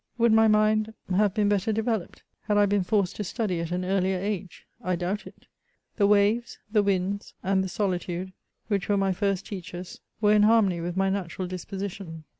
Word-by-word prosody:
Would 235 Hz, -1 st, +4 dB
my 220 Hz, 0 st, +6 dB
mind 215 Hz, +1 st, +2 dB, 0.2 s
have 205 Hz, 0 st, +2 dB
been 210 Hz, -1 st, +2 dB
better 205 Hz, +1 st, +1 dB
developed, 220 Hz, -2 st, -2 dB, 0.2 s
had 210 Hz, -1 st, +1 dB
I 205 Hz, -, +6 dB
been 200 Hz, 0 st, +2 dB
forced 195 Hz, -1 st, 0 dB
to 210 Hz, -, -2 dB
study 190 Hz, -2 st, -2 dB
at 165 Hz, -1 st, -3 dB
an 180 Hz, +1 st, -1 dB
earlier 190 Hz, 0 st, +1 dB
age? 195 Hz, -1 st, -4 dB, 0.2 s
I 185 Hz, 0 st, 0 dB
doubt 180 Hz, +4 st, -3 dB
it; -, -, -15 dB, 0.5 s
the 200 Hz, -3 st, +4 dB
waves, 210 Hz, +3 st, +2 dB
the 210 Hz, -1 st, +4 dB
winds, 200 Hz, 0 st, -1 dB
and 190 Hz, 0 st, +2 dB
the 190 Hz, -, -4 dB
solitude, 185 Hz, -1 st, -2 dB, 0.3 s
which 200 Hz, -3 st, -1 dB
were 205 Hz, -, +3 dB
my 195 Hz, -1 st, +1 dB
first 195 Hz, 0 st, -1 dB
teachers, 185 Hz, -2 st, -8 dB, 0.2 s
were 210 Hz, -1 st, +4 dB
in 210 Hz, -, +5 dB
harmony 210 Hz, -5 st, +4 dB
with 175 Hz, +2 st, -4 dB
my 195 Hz, 0 st, +2 dB
natural 185 Hz, -1 st, -3 dB
disposition. 185 Hz, -2 st, -6 dB
200 Hz, 190 wpm, -26 LUFS, 185-210 Hz, 0.5 s, my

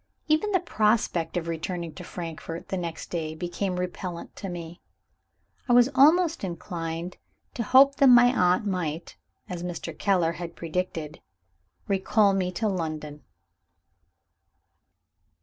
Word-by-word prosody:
Even 315 Hz, +7 st, +2 dB
the 375 Hz, -, +3 dB
prospect 210 Hz, -, 0 dB
of 170 Hz, -1 st, -3 dB
returning 170 Hz, 0 st, -4 dB
to -, -, -9 dB
Frankfort, 165 Hz, -1 st, -7 dB
the -, -, -1 dB
next 170 Hz, -2 st, -5 dB
day, 160 Hz, -2 st, -3 dB
became 175 Hz, +3 st, -3 dB
repellent 180 Hz, -1 st, -5 dB
to 195 Hz, -, -6 dB
me. 170 Hz, -1 st, -8 dB, 0.9 s
I -, -, +5 dB
was 245 Hz, +1 st, +6 dB
almost 320 Hz, -, +4 dB
inclined 170 Hz, -1 st, -5 dB, 0.4 s
to -, -, -3 dB
hope 270 Hz, +5 st, +5 dB
that 275 Hz, -, +5 dB
my 245 Hz, 0 st, +7 dB
aunt 180 Hz, +1 st, +3 dB
might 170 Hz, -4 st, -3 dB, 0.3 s
(as 180 Hz, -4 st, -5 dB
Mr. 175 Hz, -1 st, -5 dB
Keller 180 Hz, -5 st, +2 dB
had 170 Hz, 0 st, -7 dB
predicted) 165 Hz, -2 st, -4 dB, 0.7 s
recall 200 Hz, +1 st, +3 dB
me 185 Hz, -2 st, 0 dB
to 220 Hz, +5 st, -1 dB
London. 155 Hz, -5 st, -4 dB
180 Hz, 130 wpm, -26 LUFS, 165-215 Hz, 0.9 s, my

